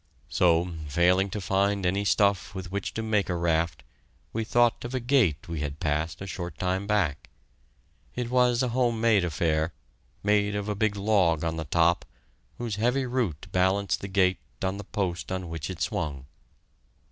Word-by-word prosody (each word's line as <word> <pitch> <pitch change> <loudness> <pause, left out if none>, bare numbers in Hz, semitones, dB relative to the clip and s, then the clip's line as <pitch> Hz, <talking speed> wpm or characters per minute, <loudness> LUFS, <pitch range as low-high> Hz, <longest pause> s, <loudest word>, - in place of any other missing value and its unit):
So, 85 0 +2
failing 90 +6 +3
to 105 - -4
find 100 +1 +1
any 100 +3 +1
stuff 100 -1 +2
with 95 -1 -6
which 100 0 -3
to 110 - -2
make 105 -3 +1
a 90 - 0
raft, 85 -4 0 0.5
we 115 - -1
thought 120 +1 +2
of 120 +2 -4
a - - +1
gate 120 - +2
we 85 -2 -4
had 75 0 -4
passed 80 +3 -1
a - - -4
short 90 -2 -6
time 95 +2 -1
back. 90 -9 0 0.9
It 120 -1 -3
was 125 0 +3
a 125 - 0
home 120 -2 +1
made 110 -4 +4
affair, 80 -1 0 0.5
made 105 0 +2
of 105 0 -3
a 105 - 0
big 105 0 +1
log 95 -6 +2
on 80 -1 -1
the 80 - -3
top, 85 +3 +2 0.5
whose 115 -4 -3
heavy 125 +4 +1
root 120 - -2
balanced 95 +2 +1
the 100 - -4
gate 95 -1 +2 0.2
on 95 +1 -1
the 105 - -7
post 95 -3 -3
on 95 -2 -3
which 80 -1 -5
it 95 -4 -6
swung. 70 -3 -2
95 Hz, 180 wpm, -27 LUFS, 85-105 Hz, 0.9 s, made